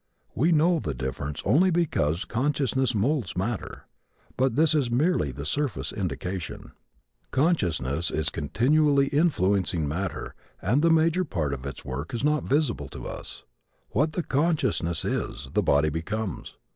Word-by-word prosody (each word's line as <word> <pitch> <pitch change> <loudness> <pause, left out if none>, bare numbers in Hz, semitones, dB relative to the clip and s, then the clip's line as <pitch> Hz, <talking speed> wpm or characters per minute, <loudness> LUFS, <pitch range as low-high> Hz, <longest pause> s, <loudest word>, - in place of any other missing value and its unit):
We 160 +9 +2
know 165 +2 +4
the 75 - -3
difference 65 +3 -4
only 155 - +4
because 125 - +1
consciousness 130 -1 0
moulds 120 - 0
matter. 110 +4 -3 0.5
But 130 -2 +1
this 155 +2 +4
is 140 -6 +1
merely 125 - +1
the 70 +3 -7
surface 140 - -1
indication. 90 -2 -4 0.6
Consciousness 85 - +1
is 80 +1 -1
continually 140 - +2
influencing 95 - +2
matter 85 +4 -3 0.3
and 120 +10 +2
the 165 - +4
major 165 +3 +3
part 80 - -2
of 70 0 -5
its 70 - -8
work 70 - -4
is 120 - -3
not 150 0 +2
visible 135 - 0
to - - -8
us. - - -7 0.5
What 150 +8 +1
the 175 - -1
consciousness 140 - 0
is, 65 0 -3
the - - +3
body 75 +2 +3
becomes. 95 +5 -4
115 Hz, 145 wpm, -26 LUFS, -, 0.6 s, know